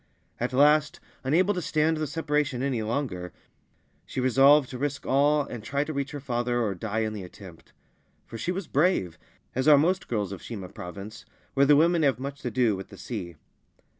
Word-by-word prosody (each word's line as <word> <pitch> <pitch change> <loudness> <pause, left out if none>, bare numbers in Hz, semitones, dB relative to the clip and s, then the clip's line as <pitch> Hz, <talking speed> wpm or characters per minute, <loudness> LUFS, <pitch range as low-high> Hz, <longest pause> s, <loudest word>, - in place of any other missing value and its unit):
At 125 - -1
last, 150 +3 +3 0.2
unable 175 +9 +2
to 180 - -3
stand 155 0 +1
the 155 -1 -2
separation 150 -4 -1
any 130 -5 -1
longer, 110 -7 -3 0.7
she - - -6
resolved 135 +3 +5
to 125 - -6
risk 145 0 -3
all 145 +2 +3
and 120 -5 -8
try 140 +4 -1
to 155 - -5
reach 140 -1 -2
her 145 - -6
father 120 -2 -1
or 110 -4 0
die 110 +4 -3
in 110 -1 -2
the 105 - -6
attempt; 90 - -13 0.5
for - - -11
she 170 - -1
was 185 +1 -4
brave, 140 - +1 0.3
as 130 +3 -1
are 150 -2 +8
most 180 +6 +1
girls 105 -5 -2
of 100 - -7
Shima 100 -6 -7
Province, 100 +6 -9 0.3
where 140 0 +4
the 145 - +7
women 165 +3 +4
have 140 -3 +3
much 140 +2 -6
to 125 - -3
do 115 -2 +2
with 95 0 -8
the - - -12
sea. 90 -8 -6
135 Hz, 195 wpm, -27 LUFS, 110-150 Hz, 0.7 s, are